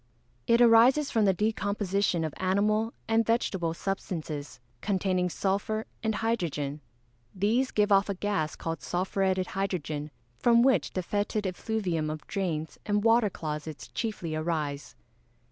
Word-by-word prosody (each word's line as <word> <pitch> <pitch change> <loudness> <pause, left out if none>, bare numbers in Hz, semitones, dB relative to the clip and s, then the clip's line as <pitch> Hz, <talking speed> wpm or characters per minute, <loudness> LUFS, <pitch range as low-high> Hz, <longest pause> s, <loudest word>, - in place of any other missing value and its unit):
_ - - -39 0.4
It 235 +1 +4
arises 240 +5 +6
from 220 -3 +3
the 195 - +4
decomposition 200 -3 0
of 155 -3 -3
animal 210 +4 +1 0.2
and 225 0 +3
vegetable 190 -7 0
substances, 155 -7 -4 0.2
containing 185 -2 0
sulphur 205 +4 -1 0.2
and 220 -1 0
hydrogen. 155 -10 -2 0.5
These 225 +7 +2
give 210 0 +1
off 200 +1 +4
a 200 - -1
gas 190 -6 -1
called 165 0 -4
sulphuretted 190 +1 0
hydrogen, 155 -6 -2 0.3
from 235 -1 +5
which 265 -1 +2
the 185 - -2
fætid 205 +3 -1
effluviam 185 -4 -1
of 155 0 -6
drains 165 -5 -3
and 205 -1 0
water 225 -1 +4
closets 150 -4 -6
chiefly 200 -8 -3
arise. 155 -3 -3
195 Hz, 135 wpm, -28 LUFS, 165-220 Hz, 0.5 s, arises